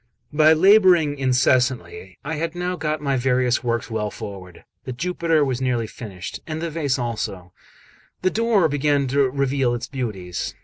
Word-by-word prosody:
XXXVIII 145 - -10
BY 155 +1 +7
labouring 175 -5 +5
incessantly 125 -8 +1
I 160 - -3
had 165 +2 -3
now 180 +1 -2
got 155 -2 -2
my 140 -2 +1
various 125 -1 +1
works 115 -1 -2
well 105 -1 -1
forward; 95 -4 -9 0.2
the - - -6
Jupiter 165 +1 0
was 130 -1 -2
nearly 125 -3 0
finished, 100 -4 -8
and 155 -1 -4
the 165 0 -3
vase 145 -5 -1
also; 105 -7 -4 0.7
the 185 - +2
door 225 -6 +2
began 145 -1 +1
to 140 0 +2
reveal 135 -2 0
its 120 - -4
beauties. 105 -10 -5
135 Hz, 165 wpm, -22 LUFS, 120-155 Hz, 0.7 s, BY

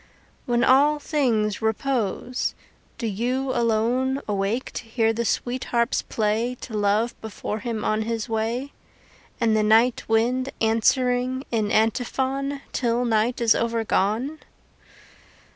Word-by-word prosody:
When 240 -1 +2
all 285 +4 +5
things 235 -9 0
repose, 235 +1 -1 0.4
do 235 - -4
you 250 +6 -1
alone 240 +3 +1
Awake 205 +4 -1
to - - -6
hear 225 0 +1
the 235 +1 -2
sweet 245 +3 -1
harps 235 0 +1
play 225 +3 -1
To 225 - -7
Love 210 +3 +1
before 220 0 -5
him 220 -1 -4
on 215 0 +1
his 225 0 -2
way, 230 +5 -2 0.7
And 225 -2 +2
the 215 - +3
night 225 +3 +4
wind 245 +4 +1
answering 250 +3 +1
in 220 -3 0
antiphon 265 +5 0
Till 240 0 0
night 230 +2 +1
is 230 -1 +5
overgone? 230 +4 0
235 Hz, 125 wpm, -24 LUFS, 220-255 Hz, 0.7 s, all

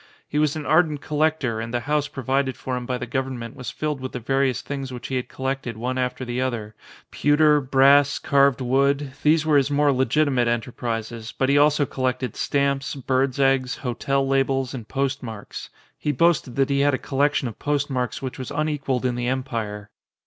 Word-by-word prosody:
He 150 - -1
was 150 -1 +2
an 155 -2 -5
ardent 155 -2 +3
collector 150 -6 0
and 115 +1 -5
the 120 0 -1
house 150 +3 0
provided 135 -1 -1
for 130 - -4
him 125 -1 -5
by 125 - -1
the 125 - -5
government 125 -2 -4
was 125 -3 -6
filled 150 -3 -3
with 130 - -5
the 125 - -3
various 135 +1 0
things 135 -2 -5
which 125 -1 -7
he 135 - -2
had 125 - -2
collected 130 -3 -3
one 125 +3 -2
after 125 0 -2
the 120 +1 -2
other, 115 -5 -3 0.4
pewter, 150 0 +4
brass, 140 +1 +4
carved 140 -1 +3
wood; 140 +2 +1
these 155 +1 +3
were 155 -2 +4
his 140 0 +2
more 145 0 +3
legitimate 130 -1 +2
enterprises; 115 -1 -3
but 130 - +1
he 140 - +4
also 145 0 +4
col 130 -1 -4
lected 125 -2 -1
stamps, 140 -1 0
birds' 130 0 0
eggs, 135 -1 +2
hotel 135 +2 -1
labels, 135 -1 +1
and 120 -5 -7
post 135 0 -1
marks.: 110 -4 -8 0.3
he 150 - 0
boasted 145 -3 +2
that 135 0 +1
he 140 - +2
had 145 0 +3
a - - -2
collection 140 +1 0
of 115 - -8
postmarks 135 -4 -1
which 130 -1 -5
was 130 - -5
unequalled 145 -4 -1
in 125 - +1
the 120 0 -2
Empire. 115 -6 -3
135 Hz, 195 wpm, -23 LUFS, 125-140 Hz, 0.4 s, pewter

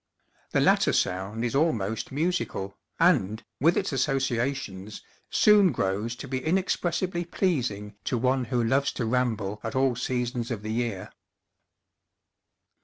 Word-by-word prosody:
The - - +1
latter - - +4
sound 95 +5 -1
is 120 - -2
almost 115 -8 0
musical, 145 - -2 0.2
and, 115 - +3 0.2
with 165 +6 +4
its - - -1
associations, 130 -6 -1 0.3
soon 205 -4 +5
grows 105 +1 -1
to 130 - -8
be 130 0 -3
inexpressibly 175 0 0
pleasing 125 - -1
to 125 - 0
one 130 +1 +1
who 120 0 0
loves 135 +4 +2
to 125 - -2
ramble 110 -4 -1
at 110 - -4
all 130 -1 +2
seasons 125 -1 -2
of 110 -4 -4
the 110 0 -3
year. 115 -5 -3
125 Hz, 130 wpm, -27 LUFS, 110-140 Hz, 0.3 s, soon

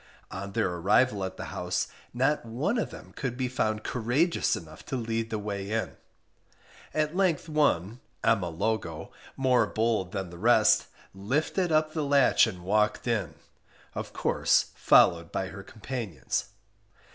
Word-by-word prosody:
On 100 +1 -6
their - - +1
arrival 100 +4 +2
at 95 - -5
the - - -5
house - - -1 0.2
not 135 +5 +1
one 140 - -1
of - - -2
them - - -12
could 125 -3 -3
be 130 -1 0
found 110 -4 -1
courageous 130 +9 +1
enough 80 -2 -10
to - - -3
lead 115 -2 -2
the 110 - -2
way 100 -1 -4
in; 115 0 -2 1.0
at 155 +1 -1
length 180 -5 +1
one 125 - +1 0.2
(Emma 105 -6 +2
Logo) 85 -2 -3 0.3
more 125 -4 +3
bold 110 -4 0
than 95 -3 -4
the 85 - -11
rest 110 0 +4 0.3
lifted 150 - -1
up 155 0 +2
the 155 - -1
latch 140 -4 +4
and 90 -5 -7
walked 105 +5 +1
in, 100 -10 -1 0.6
of - - -5
course - - +2
followed 85 -1 +4
by 95 - -2
her 100 +1 -9
companions. 105 - -4
110 Hz, 150 wpm, -28 LUFS, 95-130 Hz, 1.0 s, rest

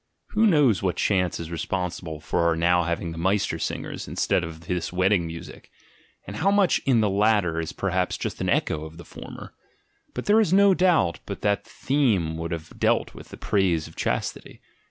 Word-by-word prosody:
Who 220 0 +3
knows 145 - +4
what 95 -3 0
chance 90 -3 0
is 85 0 -6
responsible 85 -1 -3
for 80 - -2
our 85 - +2
now 85 +1 +2
having 85 0 -2
the 80 - -7
Meister 100 +4 0
singers - - -4
instead - - 0
of 80 0 -7
this 85 0 -3
wed 95 +1 +2
ding 85 -5 +2
music? 85 0 -10 0.6
And 100 +2 -7
how 195 - +2
much 200 -3 +3
in 120 -4 +4
the 105 - +2
latter 100 -7 +2
is 80 - -3
perhaps 90 -2 -1
just - - -4
an - - 0
echo 75 - 0
of 80 +1 -10
the 85 - -11
former? - - -10 0.6
But - - -4
there 210 +2 +5
is 205 - +1
no 200 0 +6
doubt 175 - +2
but - - -6
that 100 0 0
the - - -20
theme 110 - 0
would 85 0 -3
have 80 -1 -7
dealt - - +1
with - - -12
the - - -10
praise 90 -6 +1
of 80 - -15
chastity. - - -3
90 Hz, 200 wpm, -25 LUFS, 85-110 Hz, 0.6 s, no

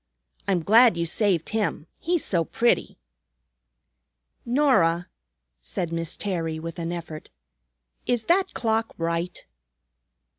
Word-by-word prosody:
I'm 185 -4 +1
glad 225 0 +6
you 170 - 0
saved 175 -1 +1
him, 215 -8 -1
he's 345 -1 0
so 170 -3 +1
pretty." 235 +8 0 1.5
"Norah," 235 - +3 0.5
said 170 - -4
Miss 165 -1 -3
Terry 165 -5 -2
with 165 +2 -7
an 165 0 -3
effort, 165 -3 -7 0.8
"is 240 -2 +1
that 375 - +2
clock 225 -1 -1
right?" 170 +1 -3
180 Hz, 110 wpm, -25 LUFS, 165-230 Hz, 1.5 s, glad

